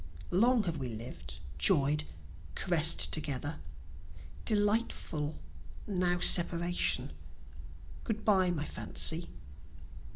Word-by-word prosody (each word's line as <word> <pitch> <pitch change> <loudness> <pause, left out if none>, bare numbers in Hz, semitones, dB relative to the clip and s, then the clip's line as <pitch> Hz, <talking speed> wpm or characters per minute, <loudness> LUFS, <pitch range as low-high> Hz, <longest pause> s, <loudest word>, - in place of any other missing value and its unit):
Long 230 +5 +2
have 170 -4 -4
we 130 -3 -5
lived, 115 +2 -8 0.2
joy'd, 145 - +2 0.5
caress'd 165 -2 +3
together; 145 -1 -3 0.9
Delightful! 205 -8 -1 0.5
now 180 -3 -1
separation 175 0 +3 0.9
Good 220 -2 -5
bye 190 -4 +3
my 155 -4 -3
Fancy. 165 +2 +1
175 Hz, 85 wpm, -30 LUFS, 150-195 Hz, 0.9 s, caress'd